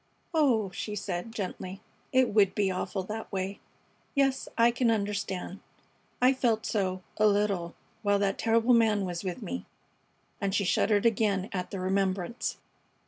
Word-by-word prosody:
"Oh," 245 - +3
she 210 +3 -4
said, 195 +1 -4
gently, 190 -2 -5 0.3
"it 260 -4 +3
would 200 -3 +4
be 200 -2 +2
awful 190 +1 -2
that 215 +3 -6
way. 195 0 -3 0.6
Yes, 270 -1 +2
I 235 +1 +6
can 240 0 +1
understand. 200 -3 -2 0.6
I 255 +2 +5
felt 235 -4 +1
so, 185 -3 -1
a 215 - +5
little, 200 -4 +1 0.3
while 205 -1 +3
that 200 -1 0
terrible 230 +2 +3
man 220 -4 +3
was 175 0 -4
with 185 -2 -4
me." 85 +1 -5 0.7
And 195 0 0
she 200 - +1
shuddered 205 +4 +2
again 205 -3 +2
at 180 -2 -3
the 195 - -5
remembrance. 190 +2 -1
205 Hz, 150 wpm, -29 LUFS, 190-225 Hz, 0.7 s, I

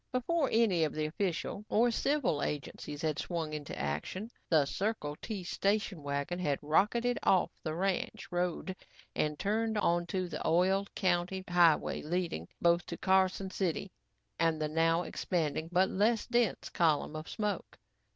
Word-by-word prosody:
Before 275 +4 +1
any 215 -7 +3
of 155 - 0
the 155 0 0
official 180 +4 -2
or 235 +3 +4
civil 270 - +1
agencies 145 +1 -4
had 155 -2 0
swung 165 -3 -3
into 150 -2 -5
action, 75 - -3 0.2
the 155 -4 +5
Circle 185 -3 -2
T 210 -5 -4
station 200 -1 0
wagon 140 +5 -2
had 145 -6 +1
rocketed 235 +10 +2
off 185 - +3
the 155 -1 -3
ranch 195 +1 -2
road 180 +1 -1 0.4
and 150 -1 0
turned 220 +3 0
onto 175 -1 +1
the - - -5
oiled, 190 +4 +2
county 185 +1 0
highway 175 -3 +3
leading 165 - -2
both 170 0 +3
to - - -5
Carson 190 0 +2
City 185 0 -2 0.5
and 165 -1 +2
the 155 -1 -1
now 165 +2 +2
expanding 160 -4 -2
but 185 +2 +4
less 215 +4 +2
dense 240 -4 +1
column 155 -2 +1
of 155 +1 -6
smoke. 210 -1 -3
180 Hz, 150 wpm, -32 LUFS, 155-200 Hz, 0.5 s, the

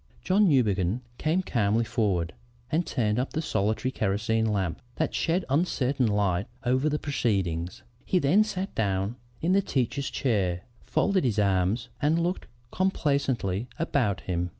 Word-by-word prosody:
"John 195 +1 +4
Newbegin 105 - +2 0.2
came 165 +5 +1
calmly 115 - +1
forward 100 -8 0 0.4
and 165 +2 +1
turned 110 -3 0
up 130 - -2
the - - -1
solitary 110 +1 0
kerosene 110 +1 0
lamp 95 -6 -1
that 160 - -1
shed 175 +2 0
uncertain 135 -4 +1
light 100 -3 +1 0.2
over 130 +4 +2
the 150 - 0
proceedings. 95 - -1 0.2
He 185 - +1
then 180 +7 +4
sat 195 -2 -4
down 100 +2 -1 0.3
in 175 +3 +3
the 200 - +4
teacher's 140 -4 -1
chair, 95 -9 0 0.2
folded 195 -3 +1
his 115 -5 0
arms, 100 +2 +1
and 150 +3 +3
looked 180 +2 -2 0.2
complacently 140 - 0
about 130 - 0
him. 90 -1 -2
120 Hz, 145 wpm, -27 LUFS, 100-150 Hz, 0.4 s, John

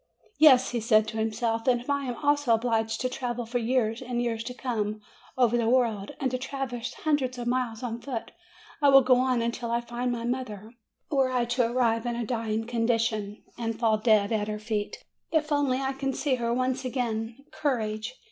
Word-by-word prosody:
'Yes," 265 -5 +7
he 240 - -1
said 220 -1 +3
to 225 - -6
himself; 225 +1 -1
"and 245 -1 +4
if 245 - -12
I 280 -1 0
am 245 -2 -3
also 290 -5 +3
obliged 225 -1 -1
to 255 - +1
travel 245 -2 -3
for 245 +2 -1
years 230 -1 0
and 245 -1 -3
years 230 -2 -1
to 250 - -5
come, 215 -5 -2 0.4
over 240 -2 +3
the 230 -1 +1
world, 230 -5 +1
and 265 -3 0
to 255 - -2
traverse 255 -3 -4
hundreds 275 -5 0
of 240 - -4
miles 245 -2 -1
on 235 -1 -4
foot, 250 -5 -5 0.5
I 285 - +6
will 270 -1 +8
go 255 0 +5
on 255 -2 +1
until 235 0 -3
I 235 0 +1
find 240 +1 -3
my 235 -1 -3
mother, 230 -4 -4 0.4
were 270 -3 +3
I 250 -2 +1
to 240 -1 +1
arrive 235 -1 +1
in 240 - -1
a 235 -1 -2
dying 225 -1 -2
condition, 230 -3 -1 0.2
and 225 -1 -3
fall 220 -2 +2
dead 215 -2 +3
at 210 -2 0
her 210 0 -3
feet! 210 -1 -3 0.3
If 310 -1 +1
only 285 -3 +2
I 270 0 -1
can 270 0 -2
see 285 0 0
her 235 -2 0
once 255 +2 0
again! 235 -3 -2 0.2
Courage!" 220 -4 -2
240 Hz, 205 wpm, -27 LUFS, 225-255 Hz, 0.5 s, will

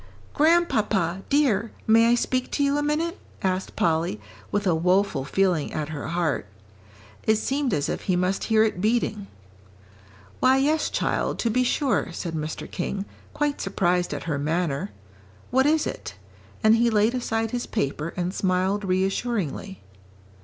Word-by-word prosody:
"Grandpapa, 215 - +2
dear, 235 -7 +2
may 225 +1 +5
I 240 - +5
speak 255 +1 -1
to 285 - +1
you 280 0 +2
a 290 - +1
minute?" 315 +4 -1 0.2
asked 185 0 -1
Polly, 170 +5 +1 0.3
with 205 0 0
a 180 - +3
woful 180 -3 +2
feeling 180 0 +1
at 155 -1 -3
her 150 -2 -5
heart. 165 -9 -1 0.8
It 220 - +5
seemed 270 +4 -1
as 145 -7 0
if - - -4
he 185 - +2
must 180 +2 0
hear 220 -1 +4
it 215 -5 -1
beating. 215 -2 0 1.1
"Why, 260 +1 +5
yes, 300 +3 +2
child, - - -1
to 230 - 0
be 250 +3 +2
sure," 250 - 0
said 170 -1 -4
Mr. 155 0 -4
King, 195 +2 -3 0.3
quite 295 -1 -1
surprised 180 -2 0
at - - -4
her 150 -4 -2
manner. 160 +2 -1 0.6
"What 265 +3 +4
is 310 0 +3
it?" - - -6 0.5
and 220 +1 +6
he 235 +1 +3
laid 220 +1 +3
aside 225 -3 -1
his 245 0 -3
paper 150 -3 -2
and 180 +1 -1
smiled 190 +2 0
reassuringly. 195 - -2
200 Hz, 155 wpm, -25 LUFS, 175-245 Hz, 1.1 s, and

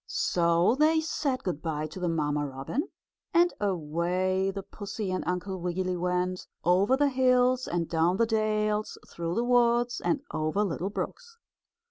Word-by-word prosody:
So 170 +3 +2
they 315 +1 +4
said 285 -4 -2
good 175 -5 -3
by 155 -2 -2
to 155 +5 -8
the 180 -1 0
mamma 150 -2 0
robin, 140 - -4 0.5
and 345 +1 +5
away 185 +1 0
the 195 0 -5
pussy 205 0 -5
and 185 - -2
Uncle 180 +1 -2
Wiggily 180 +1 -2
went, 180 +1 -1 0.2
over 195 +9 +4
the 290 0 +3
hills 255 -1 +3
and 170 -1 -1
down 170 +3 +1
the 230 - +3
dales 215 -1 0
through 170 0 -4
the 235 - +1
woods 240 0 +2
and 290 - +1
over 155 +7 0
little 190 -1 -2
brooks. 465 - -6
190 Hz, 155 wpm, -28 LUFS, 170-240 Hz, 0.5 s, and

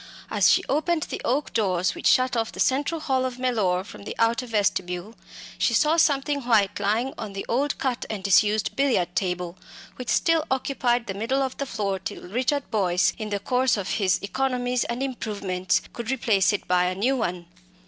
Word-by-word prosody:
As - - +4
she - - +4
opened 315 +2 +1
the - - -5
oak 275 +5 -1
doors 185 -5 +1
which - - -2
shut 255 0 +3
off 225 -1 -1
the - - -11
central 285 +5 +1
hall 260 -3 0
of 255 -1 -3
Mellor 215 -8 +1
from 200 - -12
the - - -6
outer 235 +2 +1
vestibule, 195 -2 -1 0.5
she 235 - +2
saw 305 +5 +3
something 285 -3 +2
white 215 -5 +2
lying 225 +6 0
on 215 -3 -6
the 195 - -5
old 275 +5 0
cut 255 -3 -2
and 210 -3 -4
disused 205 +2 +3
billiard 235 -11 +1
table, 180 -2 -2 0.4
which 250 -2 -6
still 330 -3 +3
occupied 250 -2 0
the 195 - -4
middle 240 +7 0
of 260 -1 -3
the 280 - -3
floor 200 -5 -2
till 190 - -7
Richard 255 +7 0
Boyce, 185 -4 +2
in 215 -1 -4
the 205 -1 -1
course 250 +3 +1
of 195 -2 -4
his 185 -2 +3
economies 250 +2 -1
and 240 +3 -3
improvements, 200 -8 -1
could 235 -1 -6
replace 220 -8 +2
it 205 - -3
by 180 0 +3
a 180 0 -1
new 245 +8 +1
one. 180 -8 -2
230 Hz, 190 wpm, -25 LUFS, 195-260 Hz, 0.5 s, As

